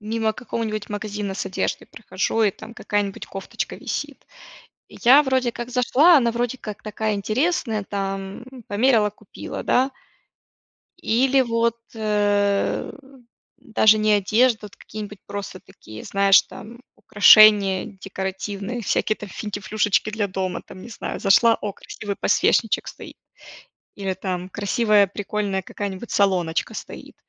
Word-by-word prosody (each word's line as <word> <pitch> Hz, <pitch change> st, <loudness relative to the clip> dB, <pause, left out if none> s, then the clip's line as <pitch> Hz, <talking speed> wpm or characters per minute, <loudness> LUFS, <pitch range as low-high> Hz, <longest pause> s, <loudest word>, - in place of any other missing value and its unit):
мимо 220 Hz, +1 st, -1 dB
какого-нибудь 215 Hz, -3 st, -4 dB
магазина 205 Hz, -1 st, -4 dB
с -, -, -3 dB
одеждой 190 Hz, -, -3 dB
прохожу, 220 Hz, +1 st, -2 dB
и 210 Hz, -, +4 dB
там 225 Hz, +4 st, -12 dB
какая-нибудь 205 Hz, -3 st, -3 dB
кофточка 195 Hz, 0 st, -6 dB
висит. -, -, -6 dB, 0.6 s
Я, 265 Hz, +5 st, +5 dB
вроде 260 Hz, -3 st, 0 dB
как, 240 Hz, +1 st, -7 dB
зашла, 265 Hz, +7 st, +5 dB
она, 235 Hz, -4 st, +2 dB
вроде 240 Hz, +2 st, -2 dB
как, 210 Hz, -4 st, -8 dB
такая 215 Hz, 0 st, -2 dB
интересная, 220 Hz, -, -1 dB
там, 195 Hz, +1 st, -5 dB, 0.2 s
померила, 220 Hz, 0 st, +3 dB
купила, 205 Hz, -, -9 dB
да. 260 Hz, +2 st, +2 dB, 1.1 s
Или 265 Hz, +1 st, +3 dB
вот, 230 Hz, -1 st, 0 dB, 0.2 s
э, 205 Hz, -2 st, 0 dB, 0.7 s
даже 220 Hz, -1 st, +3 dB
не 215 Hz, 0 st, +2 dB
одежда, 215 Hz, +4 st, +3 dB
а -, -, -9 dB
вот 205 Hz, -, -16 dB
какие-нибудь 210 Hz, -1 st, -9 dB
просто 200 Hz, -2 st, -7 dB
такие, 110 Hz, 0 st, -13 dB
знаешь, 195 Hz, 0 st, +5 dB
там, 235 Hz, +3 st, -12 dB
украшения 205 Hz, -2 st, +6 dB
декоративные, 195 Hz, +4 st, -5 dB
всякие, 215 Hz, +1 st, 0 dB
там, 210 Hz, -, -9 dB
финтифлюшечки 210 Hz, +1 st, -1 dB
для 210 Hz, -1 st, -1 dB
дома, 185 Hz, -1 st, -3 dB
там, 185 Hz, -, -12 dB
не -, -, -10 dB
знаю. 230 Hz, -, -6 dB
Зашла: 225 Hz, +3 st, +5 dB
"О, 205 Hz, -1 st, -4 dB
красивый 200 Hz, +1 st, -7 dB
подсвечничек -, -, +1 dB
стоит". -, -, -11 dB, 0.8 s
Или, 195 Hz, -2 st, -3 dB
там, 185 Hz, -1 st, -5 dB
красивая, 205 Hz, +1 st, +2 dB
прикольная 200 Hz, 0 st, -3 dB
какая-нибудь 200 Hz, +3 st, -6 dB
солоночка 180 Hz, -5 st, +1 dB
стоит. -, -, -9 dB
210 Hz, 130 wpm, -22 LUFS, 195-230 Hz, 1.1 s, украшения